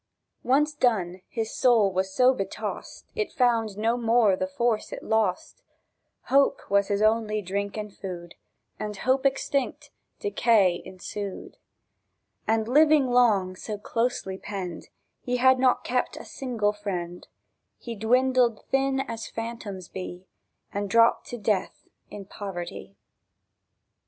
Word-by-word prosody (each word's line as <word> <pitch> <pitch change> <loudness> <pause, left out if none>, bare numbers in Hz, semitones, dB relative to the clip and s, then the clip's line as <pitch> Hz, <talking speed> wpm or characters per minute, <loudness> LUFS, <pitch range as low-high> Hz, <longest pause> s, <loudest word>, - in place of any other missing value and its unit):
Once 295 +4 +2
done, 190 -10 0
his 225 -1 -3
soul 225 -6 +4
was 190 +1 -1
so 255 +6 +5
betossed, 195 -6 -5
It 430 -2 -2
found 230 -5 +1
no 225 +3 +1
more 230 -4 +3
the 280 - -2
force 240 -6 -1
it - - -7
lost: 220 - -1 0.6
Hope 275 +1 +2
was 200 0 +3
his 205 +1 0
only 215 -1 +2
drink 200 +3 -3
and 210 -2 -6
food, 175 -3 -7 0.5
And 210 -1 -4
hope 260 +5 +2
extinct, 275 0 -2 0.3
decay 220 - +3
ensued. 195 +1 -7 0.9
And, 220 0 +1
living 295 0 +5
long 210 -7 +3
so 210 +3 -5
closely 210 -3 -2
penned, 185 -5 -6 0.3
He 250 0 -1
had 260 +1 +5
not 255 -1 +3
kept 250 0 -1
a - - -9
single 230 -6 -1
friend; 180 -4 -5 0.5
He 235 - -7
dwindled 245 +1 +2
thin 270 0 +2
as 230 -4 -5
phantoms 225 -5 -6
be, 185 -1 -7 0.5
And 200 0 -2
drooped 230 +2 +4
to 245 - -6
death 210 -3 -2 0.2
in 200 -1 -8
poverty.. 195 -1 -7
220 Hz, 130 wpm, -26 LUFS, 195-250 Hz, 0.9 s, so